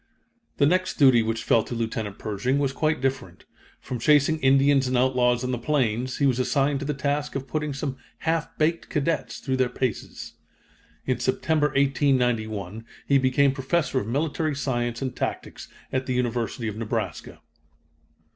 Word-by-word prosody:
The 140 Hz, -, +4 dB
next 185 Hz, +5 st, +1 dB
duty 130 Hz, -5 st, +6 dB
which 115 Hz, 0 st, -2 dB
fell 115 Hz, -, +4 dB
to 120 Hz, -, -6 dB
Lieutenant 110 Hz, -3 st, -3 dB
Pershing 110 Hz, +5 st, -1 dB
was 140 Hz, -2 st, 0 dB
quite 155 Hz, 0 st, 0 dB
different. 130 Hz, -10 st, -3 dB, 0.3 s
From 125 Hz, -, -5 dB
chasing 150 Hz, +4 st, +3 dB
Indians 135 Hz, 0 st, +4 dB
and 130 Hz, 0 st, +1 dB
outlaws 125 Hz, -1 st, +2 dB
on 125 Hz, -, -1 dB
the 125 Hz, -, -2 dB
plains, 125 Hz, -2 st, 0 dB
he 140 Hz, -, +2 dB
was 130 Hz, -2 st, +2 dB
assigned 140 Hz, +2 st, +1 dB
to 140 Hz, -, -5 dB
the 150 Hz, -, -1 dB
task 145 Hz, +1 st, -2 dB
of 135 Hz, -1 st, -4 dB
putting 150 Hz, 0 st, -2 dB
some 135 Hz, -1 st, -4 dB, 0.3 s
"half 165 Hz, 0 st, 0 dB
baked" 165 Hz, +2 st, 0 dB
cadets 150 Hz, +2 st, -1 dB
through 130 Hz, -2 st, -2 dB
their 130 Hz, -1 st, +2 dB
paces. 125 Hz, -2 st, -4 dB, 0.7 s
In -, -, 0 dB
September, 155 Hz, -2 st, +1 dB
1891, 125 Hz, -, 0 dB, 0.2 s
he 140 Hz, -1 st, +4 dB
became 130 Hz, +1 st, +3 dB
Professor 135 Hz, +2 st, 0 dB
of 105 Hz, -, -5 dB
Military 150 Hz, +4 st, -1 dB
Science 120 Hz, -3 st, -2 dB
and 130 Hz, -, -3 dB
Tactics -, -, -4 dB, 0.3 s
at 130 Hz, 0 st, -1 dB
the 130 Hz, -, -1 dB
University 120 Hz, -1 st, -1 dB
of 105 Hz, -1 st, -4 dB
Nebraska. 110 Hz, -1 st, -4 dB
130 Hz, 165 wpm, -25 LUFS, 120-145 Hz, 0.7 s, duty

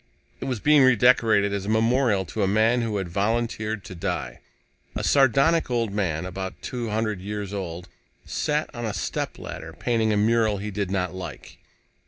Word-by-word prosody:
It -, -, -5 dB
was 130 Hz, -4 st, -2 dB
being 150 Hz, +5 st, +5 dB
redecorated 115 Hz, -5 st, +4 dB
as 100 Hz, -1 st, -3 dB
a -, -, -2 dB
memorial 110 Hz, -2 st, +2 dB
to 105 Hz, +6 st, -4 dB
a 95 Hz, -, +2 dB
man 110 Hz, +5 st, +3 dB
who 110 Hz, -3 st, -1 dB
had 95 Hz, -2 st, -3 dB
volunteered 110 Hz, +2 st, -1 dB
to -, -, -9 dB
die. 85 Hz, -9 st, -4 dB, 0.6 s
A -, -, -3 dB
sardonic 140 Hz, +4 st, +3 dB
old 115 Hz, -4 st, 0 dB
man, 90 Hz, -5 st, -1 dB
about 95 Hz, +1 st, -6 dB
two 120 Hz, -3 st, -4 dB
hundred 110 Hz, -3 st, -1 dB
years 105 Hz, 0 st, -5 dB
old, 90 Hz, -3 st, -5 dB, 0.4 s
sat 150 Hz, +1 st, -1 dB
on 120 Hz, -, -6 dB
a 110 Hz, -3 st, -2 dB
stepladder, -, -, -5 dB
painting 115 Hz, -2 st, 0 dB
a 105 Hz, -, +2 dB
mural 110 Hz, 0 st, +2 dB
he 105 Hz, +2 st, -5 dB
did 100 Hz, -1 st, -2 dB
not 90 Hz, -2 st, -1 dB
like. 85 Hz, -9 st, -8 dB
105 Hz, 175 wpm, -25 LUFS, 95-120 Hz, 0.6 s, being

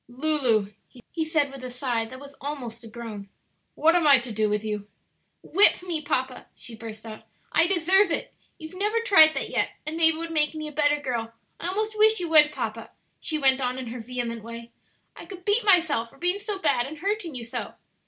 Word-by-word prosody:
"Lulu," 245 Hz, -6 st, 0 dB, 0.4 s
he 325 Hz, -, -2 dB
said, 310 Hz, -3 st, 0 dB
with 270 Hz, -1 st, -10 dB
a 255 Hz, -, -5 dB
sigh 245 Hz, -2 st, -2 dB
that 255 Hz, +3 st, -11 dB
was 280 Hz, 0 st, -12 dB
almost 245 Hz, -5 st, -6 dB
a -, -, -10 dB
groan, 220 Hz, -3 st, -9 dB, 0.5 s
"what 325 Hz, +2 st, +3 dB
am 340 Hz, -3 st, +3 dB
I 280 Hz, -2 st, +8 dB
to 240 Hz, -1 st, -5 dB
do 215 Hz, 0 st, 0 dB
with 210 Hz, 0 st, -1 dB
you?" 210 Hz, -1 st, -4 dB, 0.6 s
"Whip 390 Hz, 0 st, +4 dB
me, 340 Hz, -4 st, -2 dB
papa," 260 Hz, -4 st, -3 dB
she 230 Hz, -1 st, -6 dB
burst 220 Hz, 0 st, -10 dB
out; 215 Hz, -1 st, -9 dB, 0.3 s
"I 330 Hz, -, +5 dB
deserve 380 Hz, +2 st, +3 dB
it. -, -, -2 dB, 0.2 s
You've 315 Hz, -1 st, -10 dB
never 420 Hz, +4 st, 0 dB
tried 320 Hz, -9 st, +6 dB
that -, -, -3 dB
yet, -, -, +2 dB, 0.2 s
and 310 Hz, +2 st, -5 dB
maybe 325 Hz, -1 st, +5 dB
it -, -, -8 dB
would 335 Hz, 0 st, -5 dB
make 305 Hz, -1 st, +1 dB
me 310 Hz, 0 st, -4 dB
a -, -, -7 dB
better 295 Hz, 0 st, +2 dB
girl, 235 Hz, -5 st, -4 dB, 0.3 s
I 335 Hz, -, 0 dB
almost 430 Hz, +4 st, -1 dB
wish 435 Hz, 0 st, +4 dB
you 345 Hz, -2 st, -4 dB
would, 305 Hz, -2 st, +6 dB
papa," 225 Hz, -4 st, -5 dB, 0.3 s
she 315 Hz, -, -1 dB
went 270 Hz, -2 st, +3 dB
on 250 Hz, 0 st, -2 dB
in 255 Hz, -3 st, -6 dB
her 245 Hz, +1 st, -7 dB
vehement 235 Hz, -1 st, -5 dB
way; 230 Hz, +1 st, -9 dB, 0.4 s
"I -, -, -11 dB
could 370 Hz, -2 st, -11 dB
beat 420 Hz, +3 st, +2 dB
myself 330 Hz, -, +3 dB
for -, -, -21 dB
being 355 Hz, +3 st, +1 dB
so 415 Hz, -1 st, -3 dB
bad 270 Hz, -9 st, +1 dB
and 310 Hz, +2 st, -9 dB
hurting 385 Hz, -2 st, -3 dB
you 245 Hz, -, -5 dB
so." 230 Hz, -, -6 dB
290 Hz, 220 wpm, -25 LUFS, 235-335 Hz, 0.6 s, I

